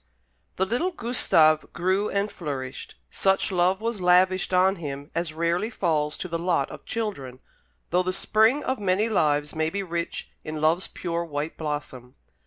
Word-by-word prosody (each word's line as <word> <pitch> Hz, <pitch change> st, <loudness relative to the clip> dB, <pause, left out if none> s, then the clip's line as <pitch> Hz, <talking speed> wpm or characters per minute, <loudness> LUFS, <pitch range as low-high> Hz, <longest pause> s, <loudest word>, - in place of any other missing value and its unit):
The 190 Hz, -, +1 dB
little 245 Hz, -, 0 dB
Gustave 165 Hz, -, +3 dB
grew 190 Hz, +4 st, 0 dB
and 200 Hz, +1 st, -1 dB
flourished. 135 Hz, -5 st, -6 dB, 0.2 s
Such 195 Hz, 0 st, +1 dB
love 185 Hz, +2 st, +2 dB
was 230 Hz, -3 st, -2 dB
lavished 185 Hz, +1 st, +3 dB
on 190 Hz, +1 st, +3 dB
him 145 Hz, -2 st, -6 dB
as 170 Hz, -1 st, -2 dB
rarely 170 Hz, +6 st, 0 dB
falls 155 Hz, -8 st, 0 dB
to -, -, -5 dB
the 165 Hz, -1 st, -3 dB
lot 170 Hz, -5 st, 0 dB
of -, -, -10 dB
children, 140 Hz, -, -4 dB, 0.5 s
though 180 Hz, +2 st, +3 dB
the 185 Hz, 0 st, -1 dB
spring 220 Hz, +8 st, +2 dB
of 260 Hz, -2 st, -1 dB
many 200 Hz, +3 st, +1 dB
lives 150 Hz, -7 st, +1 dB
may 160 Hz, 0 st, 0 dB
be 200 Hz, +4 st, -3 dB
rich 170 Hz, -2 st, -4 dB
in 155 Hz, -1 st, -5 dB
love's 160 Hz, +4 st, +2 dB
pure 170 Hz, -1 st, -3 dB
white 150 Hz, -1 st, -4 dB
blossom. 145 Hz, -5 st, -5 dB
175 Hz, 165 wpm, -25 LUFS, 155-195 Hz, 0.5 s, Gustave